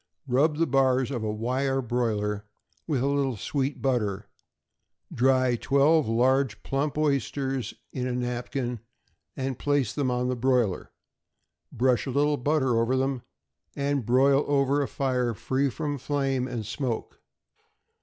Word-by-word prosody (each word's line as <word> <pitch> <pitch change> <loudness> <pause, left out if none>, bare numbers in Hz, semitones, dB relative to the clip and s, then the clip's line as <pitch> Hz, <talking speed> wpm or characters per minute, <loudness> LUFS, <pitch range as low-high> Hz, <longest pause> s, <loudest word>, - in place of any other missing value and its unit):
= - - -40
Rub 145 +4 +2
the 165 - +3
bars 130 -2 +2
of 120 -4 -3
a 110 - -1
wire 130 +5 -1
broiler 105 -4 -1 0.4
with 140 -6 0
a - - +2
little 140 -4 0
sweet 135 +6 -2
butter; 105 -7 0 0.9
dry 130 0 +3
twelve 140 +4 +3
large, 125 +1 +1
plump 140 +2 -1
oysters 135 -4 -1 0.2
in 125 -1 -2
a - - -2
napkin, 125 0 -3 0.6
and 130 -1 -3
place 145 -6 +1
them 140 -3 0
on 125 0 0
the 125 - 0
broiler; 120 -5 0 0.8
brush 125 +2 +1
a - - -2
little 145 +3 +2
butter 130 -3 +1
over 125 +3 +1
them, 135 -1 -1 0.5
and 140 -1 0
broil 135 +5 +4
over 140 0 +2
a 140 - -1
fire 125 -4 -1
free 135 +5 0
from 145 +1 -3
flame 135 -2 -1
and 120 -4 -4
smoke. 115 +1 -4
130 Hz, 145 wpm, -27 LUFS, 120-140 Hz, 0.9 s, broil